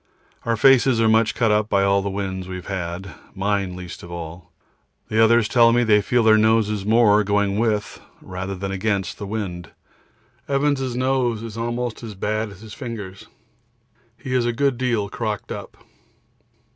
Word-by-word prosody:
Our 115 -1 0
faces 130 0 +5
are 115 - +3
much 110 0 +3
cut 115 -3 +2
up 105 0 +1
by 100 -1 +2
all 100 0 +3
the 100 - -3
winds 95 -2 -4
we 95 - -6
have 90 - -8
had, 90 -1 -5 0.2
mine 95 -1 -1
least 90 -1 -8
of 85 - -11
all; 85 0 -8 0.6
the 110 +1 +3
others 115 -1 +4
tell 115 -1 +5
me 120 +1 +3
they 105 -2 +4
feel 120 +3 +1
their 110 -1 +6
noses 105 -2 +2
more 105 -2 +5
going 100 0 +1
with 110 -3 -1 0.2
than 95 +1 -5
against 95 -2 -2
the 100 - -5
wind. 95 -5 -5 0.8
Evans' 140 -3 0
nose 125 -3 0
is 115 -2 -7
almost 120 0 -3
as 110 -3 -8
bad 110 +3 -2
as 100 0 -13
his 110 -2 -10
fingers. 105 -8 -7 0.9
He 135 -2 -6
is 125 -2 +2
a 120 - 0
good 135 0 0
deal 120 -5 0
crocked 105 0 -4
up. - - -7
105 Hz, 170 wpm, -22 LUFS, 100-115 Hz, 0.9 s, their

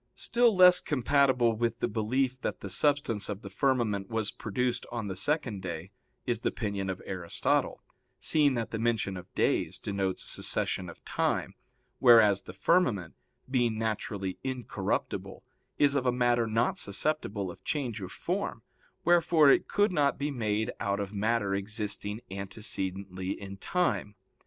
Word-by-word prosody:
Still 235 -2 +3
less 180 -1 +8
compatible 130 -3 +2
with 115 +1 -1
the - - +1
belief 125 +4 -1
that - - -3
the 100 - -6
substance 125 -2 +1
of 105 0 -5
the 100 - -8
firmament 110 -5 0
was 110 -2 -1
produced 120 +4 -2
on 115 -3 -3
the 95 - -4
second 115 - -1
day 90 0 -6 0.3
is 120 -3 0
the - - 0
opinion 100 -3 -3
of 95 - -5
Aristotle, 90 -3 -1 0.3
seeing 145 -4 +2
that 115 -2 -3
the 110 - -3
mention 115 -4 0
of 90 0 -10
days - - +1
denotes 95 -2 -2
succession 90 -2 0
of 85 - -14
time, - - -1 0.5
whereas 110 -5 +6
the 90 - -10
firmament, 105 - +1 0.3
being 120 -4 +1
naturally 105 -3 -3
incorruptible, 130 -3 -3 0.3
is 145 -1 +4
of 135 -2 0
a - - +4
matter 120 -1 +2
not 115 +2 +1
susceptible 100 -4 -1
of - - -15
change 125 -8 -2
of 95 - -6
form; - - -3 0.4
wherefore 170 -4 +5
it - - +3
could 205 0 +2
not 145 -5 +2
be 145 +1 -2
made 110 -4 -1
out 100 0 -1
of 100 0 -4
matter 105 -1 0
existing 105 +1 -2
antecedently 95 -1 -3
in 100 -1 -8
time. 135 - -1
110 Hz, 150 wpm, -29 LUFS, 100-130 Hz, 0.5 s, less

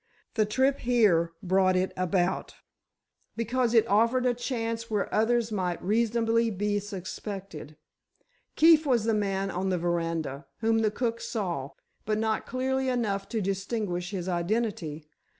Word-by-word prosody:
The 215 -3 +2
trip 265 +5 +2
here 210 -9 +3
brought 185 0 +3
it 185 +1 +1
about, 185 0 0 0.8
because 235 +1 0
it 225 - +6
offered 230 +5 +3
a 250 - +3
chance 230 -2 -3
where 210 -3 -1
others 230 +1 +2
might 180 -4 -1
reasonably 230 +2 +2
be 205 0 -1
suspected. 195 -5 -7 0.8
Keefe 320 0 +6
was 240 -5 +3
the 225 0 +1
man 195 -2 0
on 190 +2 -2
the 185 - +1
veranda, 165 -4 -2
whom 225 0 +3
the 220 -1 +2
cook 230 +1 -2
saw—but 185 - -4
not 220 0 -1
clearly 265 +1 -1
enough 210 -6 -1
to 225 -3 -1
distinguish 195 -2 -2
his 185 -3 -4
identity. 175 -4 -2
210 Hz, 135 wpm, -28 LUFS, 185-230 Hz, 0.8 s, it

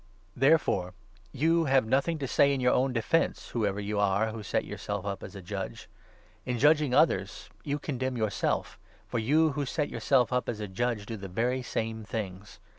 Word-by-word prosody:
Therefore 130 - +2 0.4
you 165 - +2
have 135 -3 +3
nothing 140 +8 +1
to 140 -3 -3
say 140 +2 +4
in - - -3
your 125 0 +3
own 130 +1 +2
defence, 125 +7 0
i - - -15
whoever 105 -4 0
you 105 0 -2
are 100 +2 +2
who 110 0 -6
set 100 - -1
yourself 100 -1 -5
up 100 0 -3
as - - -9
a 95 - -8
judge. 95 -8 -6 0.6
In 125 -1 -2
judging 145 0 +4
others 100 - +1
you 145 0 -1
condemn 130 -3 -3
yourself, 110 -3 -1 0.3
for 120 - -2
you 155 +8 +3
who 145 +1 -2
set 145 +2 -2
yourself 130 -3 +2
up 125 - 0
as 110 - -3
a 105 - -4
judge 105 +2 -2
do 115 +1 -5
the 100 -1 -7
very 120 +7 0
same 110 -2 -3
things. 105 -1 -6
120 Hz, 190 wpm, -29 LUFS, 105-135 Hz, 0.6 s, say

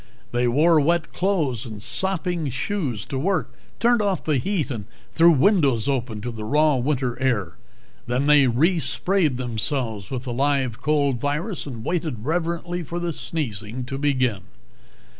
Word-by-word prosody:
They 120 +1 +1
wore 155 +6 +4
wet 170 +2 +1
clothes 165 - 0
and 110 -4 -8
sopping 175 - -1
shoes 130 - -3
to 130 +2 -4
work, 190 +6 -1 0.3
turned 235 -1 +3
off 200 -4 0
the 150 -3 +1
heat 185 -3 -1
and 110 -5 -5 0.3
threw 170 +1 +6
windows 145 - +3
open 125 -6 -1
to 120 +2 -4
the 110 -2 -7
raw 150 +5 +3
winter 130 -2 -1
air. 105 -11 0 0.5
Then 125 +3 0
they 145 -2 +6
resprayed 155 +3 +2
themselves 115 -4 -2
with 130 -2 -4
the 125 -3 -4
live 135 -2 0
cold 140 -4 +1
virus 150 - -2
and 115 -5 -7
waited 155 -10 -2
reverently 170 +2 -1
for 170 +1 -5
the 175 -1 -2
sneezing 120 -7 -4
to 135 +2 -5
begin. 130 -8 +1
140 Hz, 155 wpm, -23 LUFS, 120-170 Hz, 0.5 s, threw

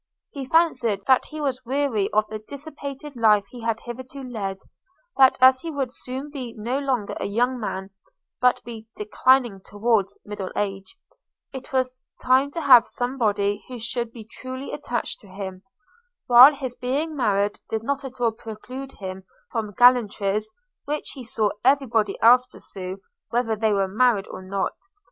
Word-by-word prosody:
He 275 -3 -6
fancied, 245 - +2
that 260 -1 +4
he 310 - -8
was 270 -4 -2
weary 250 -6 0
of 215 0 +2
the 215 0 -6
dissipated 280 +3 -8
life 215 -3 +4
he 245 - -9
had 225 -1 -1
hitherto 260 +3 -8
led; 205 -6 -4 0.6
that 265 -1 +6
as 260 0 +6
he 335 - -5
would 275 -5 -3
soon 265 +3 -6
be 255 -5 -6
no 240 +6 -2
longer 255 -7 -1
a - - -2
young 245 +5 0
man, 190 -3 -4 0.5
but 250 -1 +3
be 225 -2 -9
declining 225 0 +2
towards 205 -2 0
middle 205 -2 -5
age, 195 - -3 0.6
it 265 -1 -8
was 255 -1 -2
time 260 +2 +3
to 330 +4 -5
have 255 -5 +7
somebody 215 -5 -1
who 255 - -7
should 235 0 -3
be 230 -2 -10
truly 255 +4 -7
attached 245 -5 -4
to 205 - -14
him; 190 -1 -7 0.6
while 255 +4 +9
his 260 -3 -5
being 280 +6 -2
married 205 -5 +1
did 220 0 -2
not 280 +3 -2
at 260 -1 -9
all 235 -2 +2
preclude 250 +5 -9
him 190 -1 -7 0.3
from 220 -3 -3
gallantries, 215 -4 +3 0.4
which 300 +1 -3
he 265 - -9
saw 220 -2 0
every 275 +2 +4
body 220 -4 0
else 250 +2 +7
pursue 190 -6 -8 0.3
whether 230 -1 0
they 215 0 +1
were 195 -1 +2
married 215 0 +2
or - - -8
not. 195 +1 -2
240 Hz, 165 wpm, -24 LUFS, 210-265 Hz, 0.6 s, while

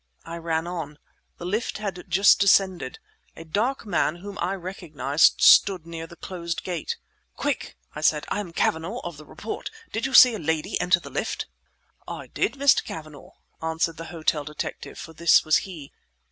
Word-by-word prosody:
I 165 +1 -6
ran 165 -1 -1
on. 165 -4 -5 0.4
The 175 - -8
lift 215 +6 -2
had 195 -4 -5
just 195 +4 +5
descended. 190 -7 +3 0.4
A 165 - -10
dark 230 +11 -1
man 175 -5 +1
whom 200 +3 -9
I 180 +3 0
recognized 165 -6 +1
stood 185 -5 +6
near 165 -1 -7
the 170 - -13
closed 170 -2 -5
gate. 175 -4 -3 0.4
"Quick!" - - -3 0.2
I 150 - -6
said, 155 -1 +2
"I - - -1
am 190 -5 -5
Cavanagh 165 +7 -1
of 175 -4 -6
the 150 0 -13
Report! 220 - -6 0.2
Did 225 +4 -1
you 265 - -2
see 250 -2 +10
a 215 - -4
lady 160 +4 -1
enter 180 -1 +3
the - - -11
lift?" - - -2 0.6
"I - - -6
did, - - -1
Mr. 280 0 +4
Cavanagh," 155 -3 -9 0.3
answered 160 0 -1
the 165 - -7
hotel 160 -3 -1
detective; 150 +1 -6
for 165 - -9
this 170 +1 +4
was 155 - +5
he. 165 -8 -7
170 Hz, 175 wpm, -25 LUFS, 160-195 Hz, 0.6 s, see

